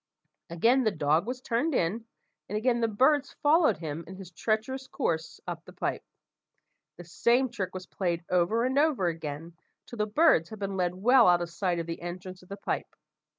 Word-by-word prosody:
Again 230 +11 +3
the 220 - +3
dog 155 +2 +1
was 250 +1 -4
turned 255 +6 0
in, 215 +6 0 0.4
and 210 - -2
again 240 +2 +1
the 230 - +2
birds 265 +6 +2
followed 300 - +4
him 160 0 -5
in 190 - -9
his 190 -2 -10
treacherous 220 +9 -2
course 165 - -2
up - - -6
the - - -14
pipe. - - -2 1.0
The 175 - -9
same 240 +9 +2
trick 195 -6 -5
was 185 0 -6
played 175 -3 -2
over 180 +7 +2
and 265 +2 +1
over 290 - +2
again, 165 -1 -4 0.3
till 240 - -10
the 210 0 0
birds 215 - +4
had 220 - -8
been 195 -1 -4
led 180 -1 0
well 240 +5 +5
out 175 -1 +4
of 170 - -7
sight 180 0 -1
of 170 - -3
the 165 0 -6
entrance 180 +1 -7
of 180 - -19
the 200 - -6
pipe. - - -4
195 Hz, 195 wpm, -28 LUFS, 170-245 Hz, 1.0 s, well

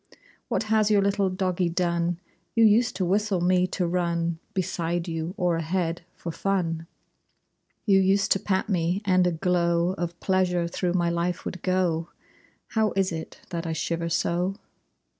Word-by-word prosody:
What - - 0
has 215 -1 +2
your 205 -2 +4
little 200 -1 +2
doggie 185 -1 0
done? 170 0 0 0.4
You 230 -1 +6
used 225 +1 +4
to 185 -1 0
whistle 200 +1 +1
me 180 +1 +3
to 185 - -1
run 170 -1 0 0.2
Beside 175 -2 -1
you, 165 +2 -3
or 175 -3 +1
ahead, 165 +1 -1
for 170 - -5
fun! 165 -3 -1 1.0
You 195 -3 +5
used 195 +1 +2
to 195 - +4
pat 190 -1 0
me, 180 +1 0
and 185 -2 +4
a - - +2
glow 170 0 +1
Of 170 0 -3
pleasure 180 -2 +1
through 175 +1 -1
my 175 -2 +1
life 170 +1 -2
would 185 - -5
go! 175 -3 0 0.6
How 220 -1 +1
is 195 -1 +1
it 160 -1 -7
that 170 -1 -3
I 160 - -1
shiver 170 +2 -2
so? 175 +3 0
180 Hz, 160 wpm, -26 LUFS, 170-190 Hz, 1.0 s, You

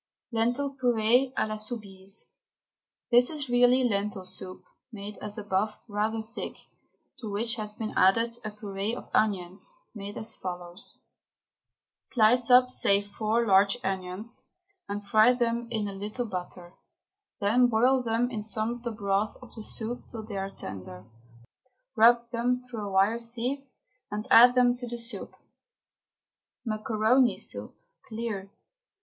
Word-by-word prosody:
LENTIL 245 +5 0
PUREE 245 +1 +3
A - - +2
LA 215 0 -4
SOUBISE. 200 -3 -4 0.8
This 245 +1 +6
is 295 -4 -4
really 245 +1 +4
lentil 200 -4 -1
soup, 185 0 -4 0.3
made 205 -1 -7
as 210 +1 -5
above, 210 0 -1
rather 220 +1 -1
thick, 225 +2 -6 0.6
to 225 -4 -6
which 225 +3 0
has 210 -1 -5
been 220 -1 -4
added 230 +5 +4
a 215 - -3
puree 210 +1 -4
of - - -10
onions, 195 - 0 0.2
made 205 -1 -7
as 220 - -3
follows: 180 +3 -6 1.0
Slice 240 +1 +3
up, 250 0 +6
say 200 -5 +3
four 215 +3 -1
large 200 +2 +4
onions, 190 +3 -3 0.4
and 205 0 -4
fry 215 +4 +5
them 235 -1 -1
brown - - -19
in 215 -3 -1
a 200 - -5
little 210 +5 -4
butter, 180 -3 -7 0.7
then 230 +5 +4
boil 250 +3 +3
them 240 +1 0
in 220 -3 -3
some 215 +2 -1
of 240 0 -6
the 240 - -3
broth 205 -1 -1
of 250 - -12
the 225 - -5
soup 230 +3 -4
till 225 -2 -7
they 210 -2 -6
are 195 0 -3
tender. 90 - -8 0.9
Rub 235 +1 +5
them 245 +1 +1
through 250 -4 -7
a - - -6
wire 195 +5 +3
sieve 245 +4 -3 0.4
and 210 +1 -4
add 245 +2 +8
them 245 -1 +5
to 245 0 -4
the 240 0 -5
soup. 230 -3 0 1.3
MACARONI 220 +3 +2
SOUP - - -4 0.3
(CLEAR). 220 -4 -4
220 Hz, 145 wpm, -28 LUFS, 200-240 Hz, 1.3 s, add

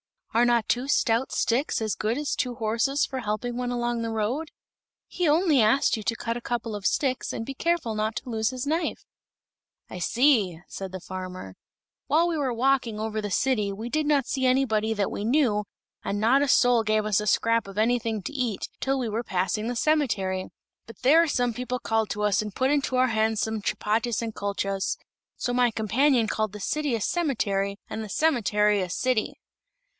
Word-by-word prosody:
"Are 235 +2 +4
not 240 -2 +2
two 245 +3 0
stout 235 -3 +1
sticks 255 +6 0
as 215 -2 0
good 220 +3 -1
as 295 0 -2
two 250 -1 -2
horses 230 +6 +1
for 265 - -5
helping 235 +1 -3
one 250 0 -2
along 240 -1 -1
on - - -2
the 230 - -2
road? 225 +8 -2 0.6
He 355 - -1
only 305 -3 +4
asked 220 +6 +3
you 220 - -5
to 230 - 0
cut 230 +1 -3
a - - -7
couple 235 -2 -3
of 205 -2 -1
sticks 260 -3 -1
and 225 - -4
be 275 - -5
careful 335 -5 0
not 215 +1 -1
to 255 - -6
lose 220 -1 0
his 255 0 -4
knife." 320 +4 -2 0.8
"I 180 - -7
see," 220 - +2
said 190 -1 -6
the 185 - -6
farmer. 185 - -7 0.5
"While 330 +3 +3
we 330 - -1
were 270 -4 0
walking 245 -2 +1
over 220 0 -2
the 205 - -4
city 210 -1 +1
we 220 +4 -6
did 305 +2 0
not 285 -4 +3
see 265 -2 -1
anybody 225 -4 +2
that 205 -2 -1
we - - -4
knew, 225 -4 +2 0.4
and 205 - -2
not 240 +6 +4
a 285 - +2
soul 245 -3 +4
gave 215 -1 +1
us 215 -1 +2
a 210 - -3
scrap 230 0 +2
of 195 0 -10
anything 225 -2 +1
to 290 - -6
eat, 245 -8 -2
till 270 0 0
we 245 -4 -2
were 225 +3 -2
passing 190 +2 -1
the 245 - -2
cemetery; 210 -11 0 0.4
but 230 -3 -12
there 320 +6 +5
some 245 -5 0
people 250 +2 -3
called 225 -3 -1
to 210 - -2
us 210 -1 +2
and 210 -2 -6
put 260 +2 +1
into 280 -3 0
our 255 0 +3
hands 220 -1 +1
some 220 -1 -2
chapatis 225 +3 -1
and 225 -1 -4
kulchas, 195 -1 -2 0.4
so 245 - -2
my 245 0 +3
companion 230 +3 +2
called 215 -1 -1
the 210 - -7
city 295 +4 -1
a 225 - -3
cemetery, 200 - 0
and 220 - -4
the 215 - -8
cemetery 210 -8 +2
a 180 - -3
city." 245 +3 0
230 Hz, 205 wpm, -26 LUFS, 210-260 Hz, 0.8 s, there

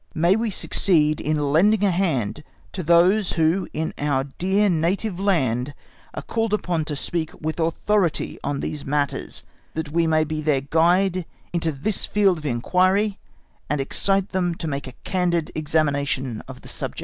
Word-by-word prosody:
_May 170 +4 +4
we 225 +1 0
succeed 155 -5 +2
in 150 -2 0
lending 205 +7 +4
a 200 - +4
hand 150 - -1 0.3
to 185 - -3
those 175 +5 +4
who 165 +4 +1
in 160 +1 -3
our 140 -2 +1
dear 190 +9 +1
native 180 +3 0
land 145 - 0 0.4
are - - -5
called 225 -2 0
upon 175 -6 -2
to 150 - -3
speak 160 +2 -3
with 155 +2 -3
authority 170 +2 0
on 140 0 -2
these 150 - -4
matters, 145 0 -2 0.3
that 160 -2 -3
we 165 +1 +2
may 155 -1 +3
be 155 0 -3
their 150 -3 +1
guide 175 +5 +2 0.3
into 165 -2 0
this 155 +9 -1
field 195 -5 +2
of 150 - -5
inquiry, 185 - +1 0.5
and 150 - 0
excite 195 +8 0
them 180 -2 0
to 165 - -5
make 140 -2 -3
a 130 - -8
candid 175 -4 0
examination 145 -6 -1
of - - -10
the - - -13
subject_. - - -5
165 Hz, 165 wpm, -23 LUFS, 150-185 Hz, 0.5 s, May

